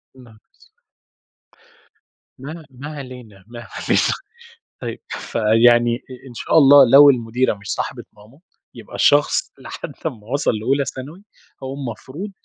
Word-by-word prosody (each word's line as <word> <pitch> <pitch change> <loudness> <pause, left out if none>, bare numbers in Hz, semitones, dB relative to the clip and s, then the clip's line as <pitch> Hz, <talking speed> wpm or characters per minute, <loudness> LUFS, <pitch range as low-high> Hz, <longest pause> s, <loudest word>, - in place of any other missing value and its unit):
يا 130 - -16
نهار 110 -3 -18
إسوِح! - - -28 1.5
ما 155 +4 -9
ما 135 +3 -10
علينا، 125 -8 -11
ما 120 0 -10
علينا. - - 0 0.7
طيب، - - -6
فيعني 120 +2 +2
آآ 130 +1 -13
إن - - -12
شاء 140 - 0
الله 140 -3 +7
لو 140 +1 +9
المديرة 120 -1 +1
مش 100 -1 -13
صاحبة - - -5
ماما، 110 +7 -19 0.3
يبقى - - -12
الشخص 145 0 +2
لحد - - -8
أمّا 110 -4 -5
وصِل 140 +3 0
لأولى 135 +5 0
ثانوي، 145 +11 -8 0.4
هو 130 +1 -5
المفروض 140 - -7
130 Hz, 135 wpm, -20 LUFS, 115-140 Hz, 1.5 s, لو